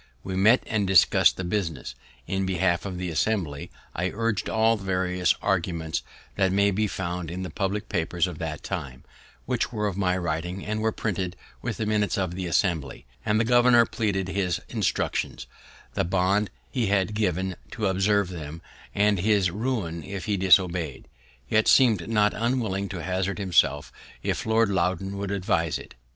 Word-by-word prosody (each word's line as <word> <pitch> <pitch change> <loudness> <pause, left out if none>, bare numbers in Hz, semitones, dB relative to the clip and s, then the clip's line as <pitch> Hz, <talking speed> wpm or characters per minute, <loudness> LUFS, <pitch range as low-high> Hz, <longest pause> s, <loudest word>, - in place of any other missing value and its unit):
We 95 - -4
met 110 +7 +5
and 105 -3 0
discussed 95 -2 +5
the 95 - -3
business. 85 - -3 0.3
In 95 0 -1
behalf 90 0 +1
of 95 -2 -5
the 90 -1 -3
Assembly, 80 -5 -1 0.2
I 90 +2 -1
urged 115 -1 -1
all 110 +1 +3
the 105 - -8
various 90 -2 +1
arguments 85 -4 -1 0.4
that 95 -2 +3
may 100 +1 +3
be 105 +2 +1
found 90 -3 -4
in 90 +2 -4
the 90 - -5
public 100 +1 -2
papers 85 +1 0
of 90 -4 -6
that 80 -1 -4
time, 70 -10 -5 0.4
which - - -1
were 105 -1 -2
of 100 -3 -2
my 90 -2 +1
writing, 85 +2 -3
and 110 +1 -2
are 110 - +2
printed 95 -4 -3 0.3
with 115 -3 -3
the 110 - -2
minutes 105 0 +1
of 95 -3 -1
the 90 0 -4
Assembly; 85 -7 0 0.2
and 105 0 +2
the - - +3
governor 120 0 +5
pleaded 100 -5 -1
his 95 -3 0
instructions, - - -1 0.5
the - - 0
bond 95 +3 +1 0.2
he 120 -5 0
had 100 +1 +1
given 95 -3 -1
to 110 - -3
observe 95 0 +2
them, 80 -3 -7 0.4
and 105 -1 +3
his 100 -2 +2
ruin 100 -7 -2
if 100 +2 -6
he 105 -2 0
disobey'd, 90 -5 +2 0.4
yet 110 +6 +2
seemed 110 -8 +4
not 105 -2 +3
unwilling 110 -5 -1
to 90 -3 -5
hazard 95 +3 -1
himself 85 -7 +2 0.3
if - - -2
Lord 110 -1 +3
Loudoun 95 +1 -1
would 100 -1 -3
advise 85 -5 0
it. - - -12
95 Hz, 170 wpm, -26 LUFS, 90-105 Hz, 0.5 s, met